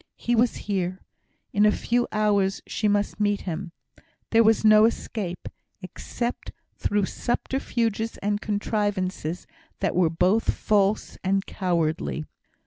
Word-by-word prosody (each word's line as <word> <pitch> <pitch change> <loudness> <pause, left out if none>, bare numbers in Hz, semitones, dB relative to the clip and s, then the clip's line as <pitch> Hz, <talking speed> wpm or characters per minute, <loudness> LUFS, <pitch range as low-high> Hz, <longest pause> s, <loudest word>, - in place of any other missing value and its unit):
He 240 - 0
was 235 +1 +3
here. 185 -2 -1 0.5
In 205 - +3
a 210 - +6
few 240 +3 0
hours 200 -2 +1
she 215 - -1
must 205 +1 0
meet 205 -1 +1
him. 175 0 -5 0.6
There 230 0 +6
was 220 0 +3
no 215 0 +7
escape, 205 -5 -3 0.4
except 235 +6 -5 0.2
through 205 -1 0
subterfuges 230 -1 -2
and 205 +1 -1
contrivances 205 -5 -2 0.3
that - - 0
were 175 -2 +4
both 180 +7 +2
false 205 0 +1
and 195 +1 +1
cowardly. 165 -4 -1
205 Hz, 125 wpm, -25 LUFS, 185-220 Hz, 0.6 s, no